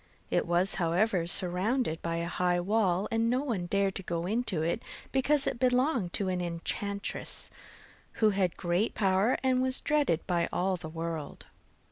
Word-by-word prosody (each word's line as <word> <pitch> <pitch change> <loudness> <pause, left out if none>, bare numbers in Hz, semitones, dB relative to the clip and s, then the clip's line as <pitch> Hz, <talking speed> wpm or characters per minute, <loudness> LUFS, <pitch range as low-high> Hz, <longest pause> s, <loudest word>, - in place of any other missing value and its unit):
It - - +1
was, 175 +3 +2
however, 175 +1 +2
surrounded 180 +2 0
by 165 0 -2
a 170 0 -1
high 180 0 +1
wall, 190 0 +1
and 225 0 +2
no 255 +3 +1
one 210 -11 -2
dared 200 +1 +1
to - - -6
go 170 -2 -3
into 200 -5 0
it 170 +8 0 0.3
because 275 +2 +2
it - - -1
belonged 250 - +2
to 200 - 0
an 180 -1 -1
enchantress, 200 +4 -3 0.6
who 215 -1 +3
had 190 -3 0
great 175 +5 0
power 195 +3 +2
and 255 -1 +3
was 260 0 0
dreaded 290 - +1
by 175 -2 0
all 185 +1 +1
the 165 -3 -7
world. 165 -2 -5
190 Hz, 165 wpm, -30 LUFS, 175-230 Hz, 0.6 s, who